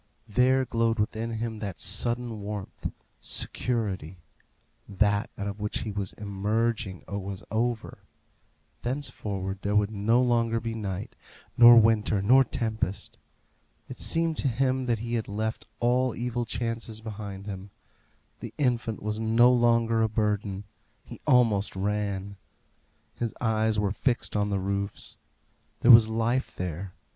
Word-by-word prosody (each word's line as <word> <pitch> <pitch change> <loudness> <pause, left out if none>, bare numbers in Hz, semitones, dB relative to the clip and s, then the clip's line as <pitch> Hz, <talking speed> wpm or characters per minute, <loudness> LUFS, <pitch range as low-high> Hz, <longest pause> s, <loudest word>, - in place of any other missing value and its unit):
There 130 +4 +3
glowed 115 -1 +1
within 110 +2 -1
him 110 -1 -4
that 100 -7 -5
sudden 120 +4 -1
warmth 100 -1 -5 0.3
security; 100 -8 -2 0.7
that 100 0 +1
out 100 - -4
of 100 +1 -5
which 105 0 -3
he 110 - -4
was 100 -2 -3
emerging 105 0 -2
was 100 -1 -5
over; 115 +1 -2 0.8
thenceforward 105 -8 -3
there 100 +1 -1
would 105 0 +3
no 110 +3 +2
longer 115 -2 +2
be 115 0 -4
night, 100 -3 -5 0.4
nor 120 0 +9
winter, 110 -2 +3
nor 125 +7 +6
tempest. 110 -6 -3 0.7
It - - -9
seemed 165 -1 +1
to - - 0
him 130 +1 0
that 120 -2 +2
he 115 +2 -5
had 115 -2 -1
left 110 +2 -3
all 125 +1 +2
evil 120 0 -2
chances 115 -1 -3
behind 100 -3 -7
him. 100 -1 -7 0.7
The - - -8
infant 120 -6 0
was 105 +1 -2
no 115 +3 +5
longer 115 -2 +3
a 110 - +2
burden. 105 -2 -1 0.4
He - - -11
almost 110 -6 +3
ran. 100 0 -2 0.8
His 115 -2 -4
eyes 110 -2 +1
were 105 -2 +1
fixed 120 +3 -1
on 105 0 +1
the 100 - 0
roofs. 100 +1 -4 0.6
There 125 - +7
was 115 -1 +9
life 115 +4 -1
there. 90 +1 -5
110 Hz, 135 wpm, -27 LUFS, 100-120 Hz, 0.8 s, nor